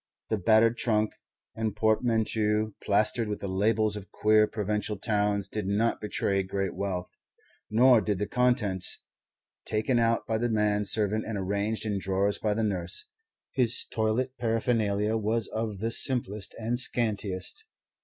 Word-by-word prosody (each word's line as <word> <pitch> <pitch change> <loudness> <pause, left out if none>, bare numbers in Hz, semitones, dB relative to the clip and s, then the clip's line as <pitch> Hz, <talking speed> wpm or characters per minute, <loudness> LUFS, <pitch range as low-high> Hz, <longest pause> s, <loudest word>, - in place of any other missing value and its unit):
The 110 - 0
battered 110 +4 +4
trunk 110 -2 0 0.4
and 110 -2 -3
portmanteau 110 -1 +1
plastered 110 +3 +3
with 105 -1 -4
the 100 - -5
labels 105 +2 +1
of 100 -1 -8
queer 110 0 +3
provincial 105 0 -2
towns 105 -1 0
did 105 -3 -4
not 105 +4 0
betray 100 -2 0
great 95 0 -3
wealth. 90 -2 -4 0.5
Nor 120 +1 +5
did 105 -3 -1
the 105 - -1
contents, 120 -7 0 0.6
taken 110 +3 0
out 115 0 +1
by 110 -1 -1
the 120 +1 0
man 105 -2 +1
servant 110 +1 +2
and 110 -2 -3
arranged 100 +3 -2
in 105 -2 -1
drawers 95 +2 0
by 105 -1 0
the 110 - -1
nurse. 90 -4 -2 0.5
His 120 -3 +3
toilet 115 +4 -1
paraphernalia 110 -2 0
was 110 +1 -1
of 110 -2 -3
the 115 +4 -2
simplest 110 -6 0
and 115 +2 -2
scantiest. 105 -7 +1
110 Hz, 145 wpm, -28 LUFS, 100-115 Hz, 0.6 s, Nor